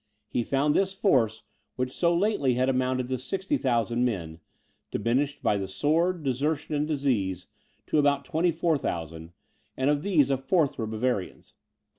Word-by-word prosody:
He 120 - -1
found 140 +4 +1
this 195 +2 +1
force, 125 - +2 0.3
which 125 0 -2
so 170 +5 +1
lately 170 - +1
had 130 +1 +1
amounted 130 -1 0
to 130 -1 -1
60,000 130 - 0
men, 85 -9 -2 0.5
diminished 135 +5 -1
by 105 - +2
the 95 -1 -3
sword, 165 - 0
desertion, 145 +4 -1
and 150 0 0
disease, 110 - -1 0.4
to 155 - +1
about 140 -1 +2
24,000, 145 - -1 0.5
and 130 +2 +1
of 145 -1 0
these 155 -8 +2
a 135 - +2
fourth 140 0 +1
were 110 - -2
Bavarians. 110 -3 -3
135 Hz, 145 wpm, -27 LUFS, 120-150 Hz, 0.5 s, force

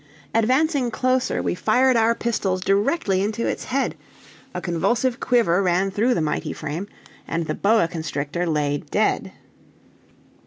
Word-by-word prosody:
Advancing 260 +4 +2
closer, 255 +3 0
we - - 0
fired 250 +7 +3
our 230 0 +3
pistols 195 -6 -1
directly 200 - +1
into 215 +3 -1
its - - -2
head, 270 +2 -1 0.6
a - - -4
convulsive 220 +9 0
quiver 220 -7 +2
ran 185 +1 +1
through 230 +6 +1
the - - 0
mighty 150 -1 -2
frame, 165 +7 -5 0.4
and 165 0 -2
the - - -2
boa 215 -3 +3
constrictor 160 0 -3
lay 145 -2 0
dead. - - -1
205 Hz, 140 wpm, -22 LUFS, 170-245 Hz, 0.6 s, fired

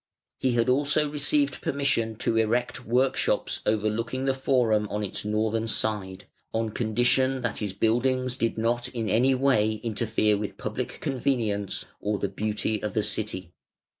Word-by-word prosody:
He 130 -2 +1
had 115 -1 +2
also 145 +3 +3
received 145 -1 +2
permission 125 -5 0
to 115 - -1
erect 120 +3 0
workshops 125 +3 +1
overlooking 110 +4 -1
the 135 - +2
Forum 120 -5 +1
on 105 0 -2
its 100 - -3
northern 110 +2 0
side, 100 -4 -1 0.3
on 115 0 0
condition 125 +4 +1
that 120 - -2
his 105 -3 -3
buildings 125 +4 +1
did 115 -3 -1
not 120 +2 0
in 115 -3 -4
any 130 +4 +3
way 125 -5 +2
interfere 110 -2 +1
with 105 -2 -5
public - - -5
convenience 115 -7 -1
or 105 0 -1
the 100 0 -2
beauty 105 +1 -2
of 105 -2 -4
the 110 - +2
city. 95 -5 -1
115 Hz, 150 wpm, -26 LUFS, 105-130 Hz, 0.3 s, also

